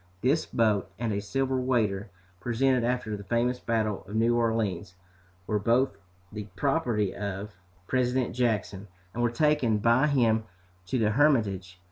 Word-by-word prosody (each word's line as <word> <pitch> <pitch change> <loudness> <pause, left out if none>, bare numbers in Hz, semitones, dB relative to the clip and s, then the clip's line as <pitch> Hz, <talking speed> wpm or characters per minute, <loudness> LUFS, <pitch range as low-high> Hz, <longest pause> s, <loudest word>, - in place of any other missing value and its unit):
This 150 +5 +1
boat, 105 -5 +1
and 115 -2 -2
a 100 - -1
silver 130 +5 -1
waiter, 110 -5 0 0.3
presented 125 +3 +1
after 120 -3 -1
the 100 - -8
famous 120 +3 0
battle 110 -4 -1
of 105 - -7
New 115 +2 +3
Orleans, 110 -6 -1 0.5
were 105 +1 0
both 115 +3 +2 0.4
the 105 -1 -6
property 120 - 0
of 100 0 -5 0.3
President 125 +2 0
Jackson, 105 -5 -1 0.3
and 120 - -3
were 120 - +3
taken 130 -3 +2
by 115 +7 +3
him 115 -6 +2 0.4
to 130 - -1
the 110 -3 +2
Hermitage. 105 -9 +1
115 Hz, 145 wpm, -28 LUFS, 105-125 Hz, 0.5 s, New